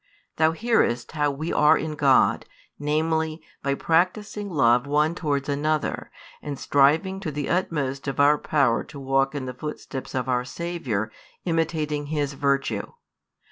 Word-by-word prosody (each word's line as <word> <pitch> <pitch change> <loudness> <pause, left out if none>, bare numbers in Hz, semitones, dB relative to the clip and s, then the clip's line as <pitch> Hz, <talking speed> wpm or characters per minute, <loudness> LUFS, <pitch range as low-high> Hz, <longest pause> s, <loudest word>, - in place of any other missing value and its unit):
Thou 160 0 +3
hearest 165 - +1
how 150 -2 +1
we 150 +4 -3
are 150 +1 +5
in 155 -1 -3
God, 140 -3 +3 0.3
namely, 160 +2 0 0.2
by 140 0 0
practising 200 +6 0
love 125 -5 +3
one 150 +3 +2
towards 145 -5 -2
another, 150 +1 -1 0.3
and 145 -2 -5
striving 155 +10 +2
to 160 - -4
the 145 -1 -3
utmost 145 -6 -1
of 135 - -3
our 145 +1 +5
power 135 -6 +2
to 140 - -11
walk 135 +1 +1
in 135 -2 -3
the 125 - -5
footsteps 135 -1 -6
of 130 -1 -1
our 125 -1 +1
Saviour, 130 -9 -3 0.3
imitating 155 -3 -1
His 145 -2 -1
virtue. 140 -7 -1
145 Hz, 145 wpm, -24 LUFS, 135-160 Hz, 0.3 s, are